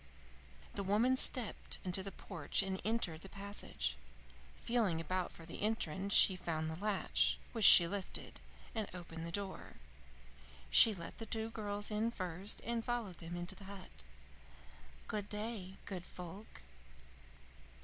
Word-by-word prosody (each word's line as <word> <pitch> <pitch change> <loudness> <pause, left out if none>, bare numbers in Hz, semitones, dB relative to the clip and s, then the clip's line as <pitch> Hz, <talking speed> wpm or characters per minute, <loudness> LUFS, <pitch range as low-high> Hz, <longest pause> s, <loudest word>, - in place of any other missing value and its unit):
The - - -3
woman 215 +7 +3
stepped 250 -3 +2
into 185 +1 +1
the 195 +1 -5
porch 170 -1 -1
and 190 -1 -3
entered 195 -7 -1
the 195 - -10
passage. 195 - -4 0.6
Feeling 220 -9 +1
about 180 +2 -2
for 165 - -12
the - - -8
entrance 200 -2 +1
she 190 - +8
found 160 -3 -2
the 165 +5 -7
latch, 210 -2 +2
which 225 -3 +1
she 170 - +10
lifted, 200 +2 -5 0.3
and 220 -2 -2
opened 165 -2 -7
the - - -6
door. 195 +1 -5 1.0
She 220 -2 +8
let 170 -2 -8
the 225 - -6
two 220 +1 -3
girls 205 -2 -3
go 210 - -2
in 225 +2 +1
first, 185 -2 -1
and 235 -1 -2
followed 235 -7 -3
them 170 +1 -6
into 175 0 -4
the 200 - -12
hut. 190 - -10 1.1
"Good 210 -1 -3
day, 210 -3 -4
good 185 -3 -5
folk!" 180 - -10
195 Hz, 150 wpm, -36 LUFS, 175-215 Hz, 1.1 s, she